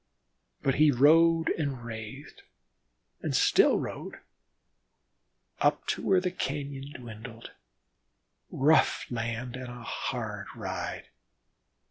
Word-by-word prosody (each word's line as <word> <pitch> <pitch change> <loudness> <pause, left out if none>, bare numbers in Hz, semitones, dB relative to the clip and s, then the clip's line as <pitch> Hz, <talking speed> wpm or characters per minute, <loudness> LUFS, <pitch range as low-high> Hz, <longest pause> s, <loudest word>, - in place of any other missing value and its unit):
But 135 - +2
he 155 - +7
rode 160 +5 +5
and 135 -6 -3
wrathed 115 +4 -8 0.8
and - - -2
still - - +5
rode, - - -5 1.4
up - - +2
to - - -1
where 190 -1 +3
the 180 0 -1
cañon 140 -3 -4
dwindled 115 -1 -9 1.0
rough 150 +4 +3
land 120 +1 -3
and 130 0 -6
a 120 -1 -9
hard 105 -4 -4
ride. 95 -5 -5
125 Hz, 100 wpm, -29 LUFS, 115-145 Hz, 1.4 s, he